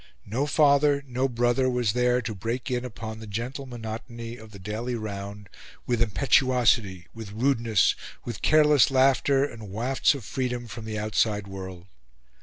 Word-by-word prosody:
No 125 +8 -1
father, 140 0 +4
no 130 +1 -1
brother, 120 +2 +1
was 120 -4 +1
there 125 0 +2
to 110 -1 -3
break 115 +6 -4
in 125 0 -1
upon 110 -2 -7
the 110 - -9
gentle 125 +7 -5
monotony 115 0 -7
of 110 -2 -13
the 105 - -12
daily 110 +6 -4
round 100 -2 -6 0.4
with 120 -2 0
impetuosity, 120 -5 +2
with 110 -3 -8
rudeness, 115 -4 +2 0.3
with 120 -3 -6
careless 150 -3 +5
laughter 135 +1 +3
and 115 -7 -9
wafts 125 +8 +1
of 130 -6 -8
freedom 125 -1 -3
from 115 -1 -8
the 110 -1 -4
outside 105 -1 0
world. 95 -2 -8
120 Hz, 155 wpm, -26 LUFS, 110-130 Hz, 0.4 s, careless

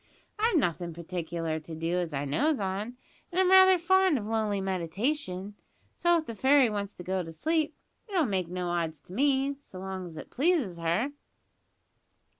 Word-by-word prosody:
I've 445 -4 +3
nothin' 170 - -1
particular 170 -2 -3
to 160 +1 -9
do 165 +3 -1
as 175 -2 -2
I 145 0 -2
knows 280 - +1
on, 205 +5 -3 0.3
an' 350 - -5
I'm 375 0 +4
raither 375 0 +8
fond 375 -1 +3
of 210 - -4
lonely 215 -2 0
meditation; 190 - -2 0.4
so 345 0 +3
if 320 - -3
the 230 - -6
fairy 265 +2 +4
wants 205 -1 -4
to 180 - -9
go 185 +1 -1
to 165 -2 -7
sleep, 310 - 0 0.3
it'll 360 -6 +2
make 190 -6 -1
no 180 0 -3
odds 165 -3 -2
to 180 - -13
me, 275 +3 +1
so 195 - -12
long's 185 -3 -6
it - - -9
pleases 275 - +1
her." 175 - 0
200 Hz, 175 wpm, -29 LUFS, 175-290 Hz, 0.4 s, raither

